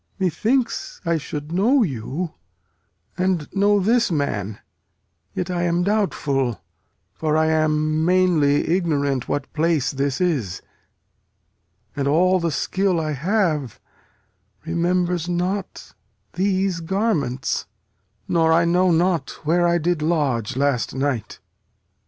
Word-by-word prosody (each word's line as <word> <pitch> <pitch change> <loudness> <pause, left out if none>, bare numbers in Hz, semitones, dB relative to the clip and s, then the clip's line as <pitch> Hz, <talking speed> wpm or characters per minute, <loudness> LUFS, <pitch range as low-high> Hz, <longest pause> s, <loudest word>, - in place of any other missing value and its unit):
Methinks 225 - -1
I 170 -1 +1
should 150 +1 -6
know 230 +9 +3
you, 150 - -4 0.9
and 180 -5 0
know 205 +1 +3
this 230 +4 +2
man; 110 - -2 0.8
Yet 180 0 -2
I 175 -1 -1
am 175 0 +1
doubtful; 145 - 0 0.5
for 155 -1 0
I 160 - +3
am 155 0 +1
mainly 170 -5 +3
ignorant 145 -7 0
What 145 -2 -3
place 160 -3 +1
this 140 0 -1
is; 135 - -1 1.3
and 140 -1 -1
all 185 +5 +3
the 170 -1 0
skill 185 +4 0
I 155 -1 -2
have 155 - -1 0.9
Remembers 175 +1 0
not 180 +3 -3 0.4
these 190 -1 0
garments; 165 - -1 0.6
nor 165 -1 +2
I 170 +1 +4
know 180 +2 +3
not 170 -3 +1 0.2
Where 175 +3 +3
I 170 0 +3
did 170 -1 0
lodge 145 -10 0
last 140 -3 0
night. 135 -5 -2
170 Hz, 115 wpm, -22 LUFS, 145-185 Hz, 1.3 s, I